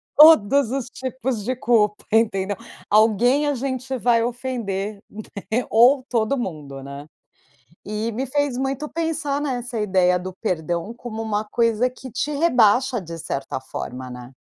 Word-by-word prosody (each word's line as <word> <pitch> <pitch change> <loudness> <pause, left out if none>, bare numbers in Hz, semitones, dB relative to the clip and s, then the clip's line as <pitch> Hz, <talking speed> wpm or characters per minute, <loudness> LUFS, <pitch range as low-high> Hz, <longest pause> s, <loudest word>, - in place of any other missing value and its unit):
Todos 280 -5 +7
os 265 -2 -2
tipos 260 -4 -4
de 255 +3 -1
culpa, 215 -4 +2
entendeu? 205 -3 +2 0.3
Alguém 230 +7 +4
a 290 - +1
gente 260 0 -3
vai 235 -1 +3
ofender, 225 -5 -3 0.5
né? 245 +3 +1
Ou 250 +4 +5
todo 235 +3 +1
mundo, 145 - -6
né? 140 +2 -9 0.8
E 215 +3 -2
me 255 +5 -3
fez 280 -1 -1
muito 270 +3 -2
pensar 315 -4 -2
nessa 245 -4 -3
ideia 185 -3 +2
do 185 0 -6
perdão 175 +1 -2
como 230 -2 -7
uma 215 -1 -1
coisa 230 +2 +1
que 255 0 -11
te 295 +5 -2
rebaixa 255 -5 +3
de 165 -1 -8
certa 140 -4 -4
forma, 130 -1 -6
né? 125 +1 -9
230 Hz, 145 wpm, -22 LUFS, 200-260 Hz, 0.8 s, Todos